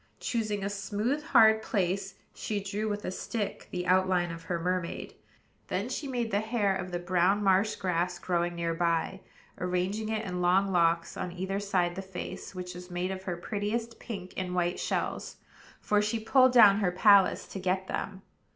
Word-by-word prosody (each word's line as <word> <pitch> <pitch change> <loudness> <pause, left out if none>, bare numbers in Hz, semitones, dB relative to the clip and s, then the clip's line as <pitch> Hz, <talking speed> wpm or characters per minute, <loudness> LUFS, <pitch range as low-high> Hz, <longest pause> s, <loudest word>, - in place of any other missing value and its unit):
Choosing 215 -4 -2
a 200 - -1
smooth, 210 +8 -1
hard 220 -6 +6
place, 195 -1 -1 0.2
she 210 -2 -3
drew 200 +2 -3
with 205 0 -3
a - - -2
stick 205 +2 -4
the 180 0 -3
outline 185 -1 +2
of 165 0 -7
her 170 0 -2
mermaid; 180 0 -2 0.5
then - - -2
she 290 - -3
made 240 -4 -2
the 200 - +2
hair 215 -3 0
of 185 -1 -4
the 175 - -2
brown 180 +3 +2
marsh 195 +2 +3
grass 180 -1 -1
growing 175 -1 -1
near 170 -1 -1
by, 170 +2 0 0.4
arranging 180 +4 -1
it 220 0 -2
in 180 -2 -3
long 190 +3 +3
locks 170 -1 +2
on 180 - -3
either 190 +2 -3
side 185 -4 0
the 190 - -5
face, 190 0 -7
which 180 0 -6
was 180 +1 -10
made 180 +1 -2
of 190 0 -5
her 180 -3 -3
prettiest 220 +5 -3
pink 195 -6 -7
and 180 -1 -3
white 175 0 0
shells, - - -2 0.4
for 210 0 +2
she 210 +2 -1
pulled 255 +3 +5
down 210 -5 +8
her 190 -4 +1
palace 195 +1 +5
to 195 - -7
get 185 +1 0
them. 190 0 -4
190 Hz, 185 wpm, -29 LUFS, 180-210 Hz, 0.5 s, down